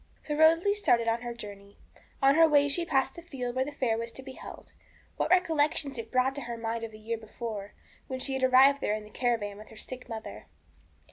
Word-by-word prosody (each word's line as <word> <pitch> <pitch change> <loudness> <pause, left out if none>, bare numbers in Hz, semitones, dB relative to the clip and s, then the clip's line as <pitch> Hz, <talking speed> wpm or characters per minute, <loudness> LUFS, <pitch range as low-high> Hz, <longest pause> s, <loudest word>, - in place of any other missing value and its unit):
So 300 - -3
Rosalie 330 +6 +5
started 245 - +2
on 230 +1 +1
her 240 -1 -5
journey. 200 -3 -10 0.5
On 275 +1 +7
her 325 +1 +6
way 290 -1 +5
she 340 +5 +1
passed 270 -3 +1
the 340 - -10
field 255 -7 -5
where 260 - +2
the 295 - -5
fair 245 -6 0
was 230 0 -4
to 265 - -8
be 265 - -8
held. - - -11 0.4
What - - 0
recollections 310 -5 +2
it 225 0 -7
brought 255 +1 +2
to 280 - -6
her 240 -2 -5
mind 230 0 -3
of 225 - -5
the 215 - -12
year 225 +1 -4
before, 215 -2 -7 0.3
when 260 -1 -4
she 270 +1 -2
had 265 - -2
arrived 265 +2 +6
there 210 - +1
in 215 - -6
the 210 - -14
caravan 215 -4 -1
with 215 - -12
her 220 - -14
sick 250 +3 -7
mother. 220 - -7
255 Hz, 230 wpm, -29 LUFS, 225-280 Hz, 0.5 s, On